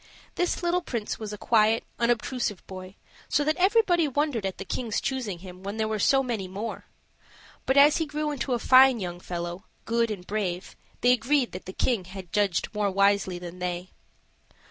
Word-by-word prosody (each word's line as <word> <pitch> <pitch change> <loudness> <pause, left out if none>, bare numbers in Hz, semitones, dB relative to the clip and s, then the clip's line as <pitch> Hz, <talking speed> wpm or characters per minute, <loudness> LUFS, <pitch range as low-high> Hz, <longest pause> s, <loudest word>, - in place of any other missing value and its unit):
This 355 0 -1
little 350 +1 +2
prince 235 -10 -4
was 215 -2 -5
a 210 - -6
quiet, 220 +1 +3 0.2
unobtrusive 235 -3 -1
boy, 185 0 -9 0.3
so 290 - +2
that 310 +1 +1
everybody 370 -4 +3
wondered 280 -7 0
at 190 - -5
the - - -6
King's 230 -4 -2
choosing 245 -9 -3
him 180 0 -10
when 200 +3 -5
there 220 -1 0
were 215 -1 -2
so 270 +6 +4
many 225 -7 -3
more; 200 +5 -6 0.8
but 265 - +2
as 290 +2 +7
he 320 - -1
grew 300 0 -2
into 270 -2 -2
a - - +2
fine 260 +1 +6
young 175 -2 -5
fellow, 175 +1 -5 0.2
good 230 0 +1
and 195 -4 -5
brave, 190 -3 -3 0.3
they 245 - +5
agreed 250 +2 +2
that 185 - -8
the - - -4
King 220 0 0 0.3
judged 200 -2 0
more 210 -1 +1
wisely 200 -1 +2
than 175 0 -9
they. 180 0 -4
220 Hz, 185 wpm, -27 LUFS, 190-265 Hz, 0.8 s, as